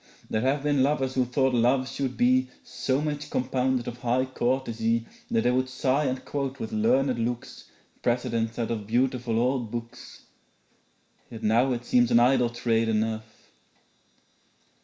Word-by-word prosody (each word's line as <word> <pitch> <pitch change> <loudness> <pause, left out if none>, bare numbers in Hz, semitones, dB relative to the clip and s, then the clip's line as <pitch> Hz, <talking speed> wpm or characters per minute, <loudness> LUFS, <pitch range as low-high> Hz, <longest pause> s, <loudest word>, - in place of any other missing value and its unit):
There 110 - +1
have 135 +3 +1
been 145 -2 +2
lovers 135 -1 +1
who 130 -1 +2
thought 130 +1 +1
love 125 +2 +2
should 135 -2 -3
be 130 +1 +3
So 135 +1 -1
much 150 -1 -3
compounded 130 -1 0
of 120 0 -6
high 125 +1 +1
courtesy 115 -3 -1 0.2
That 230 -1 +2
they 125 - +3
would 130 +1 0
sigh 130 +3 0
and 130 -1 -2
quote 140 -2 -3
with 110 - -5
learned 125 +4 +2
looks 120 +1 -4 0.4
Precedents 115 -2 -1
out 115 -1 -2
of 105 -3 -4
beautiful 120 0 0
old 125 -1 0
books; 120 +1 -8 1.1
Yet 115 -1 -9
now 115 +5 +3
it 120 0 -5
seems 120 -1 +3
an 120 -1 +5
idle 125 0 +4
trade 115 -1 0
enough.' 110 0 -3
125 Hz, 155 wpm, -26 LUFS, 115-130 Hz, 1.1 s, an